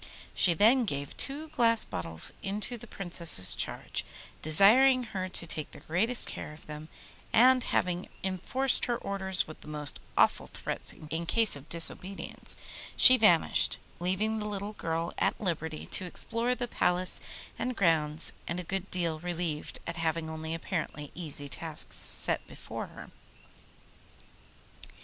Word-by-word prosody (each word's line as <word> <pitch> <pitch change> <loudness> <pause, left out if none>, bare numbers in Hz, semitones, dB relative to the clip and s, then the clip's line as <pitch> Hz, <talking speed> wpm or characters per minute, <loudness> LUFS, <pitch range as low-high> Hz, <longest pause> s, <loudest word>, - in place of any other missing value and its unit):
She 175 -3 +3
then 235 +7 +5
gave 140 -7 -4
two 295 +3 -1
glass 235 -6 +2
bottles 80 -1 -2
into 205 +4 -3
the 240 0 -10
Princess's 170 - +1
charge, - - 0 0.4
desiring 245 - +6
her 190 -5 -5
to 175 - -1
take 155 -2 -4
the - - -12
greatest 220 +9 0
care - - -6
of 150 - -15
them, 150 +1 -9 0.4
and 255 +2 +5
having 180 0 -1
enforced 215 +8 +4
her 240 -1 -1
orders 190 -3 0
with 155 - -12
the - - -13
most 150 -2 -4 0.2
awful - - +3
threats - - -3 0.2
in 165 +1 -3
case 225 0 +3
of 145 +2 -12
disobedience, 180 +3 -3 0.4
she 255 - +9
vanished, 210 -9 +4 0.2
leaving 200 +5 -1
the 210 - -4
little 205 +1 -5
girl 165 -3 -3
at - - 0
liberty 160 -5 -3
to 185 - +2
explore 230 +7 -1
the 245 -1 -3
palace 180 -4 0 0.4
and 250 0 -2
grounds 160 -4 +4
and 170 +2 -3
a - - -4
good 195 +2 -4
deal 170 -3 -2
relieved 170 -3 -4
at 170 0 -5
having 165 -1 -2
only 160 0 -6
two 165 - -2
apparently 160 -4 -5
easy 150 -4 -3
tasks 140 - 0
set - - +1
her. - - -9
180 Hz, 145 wpm, -29 LUFS, 160-220 Hz, 0.4 s, she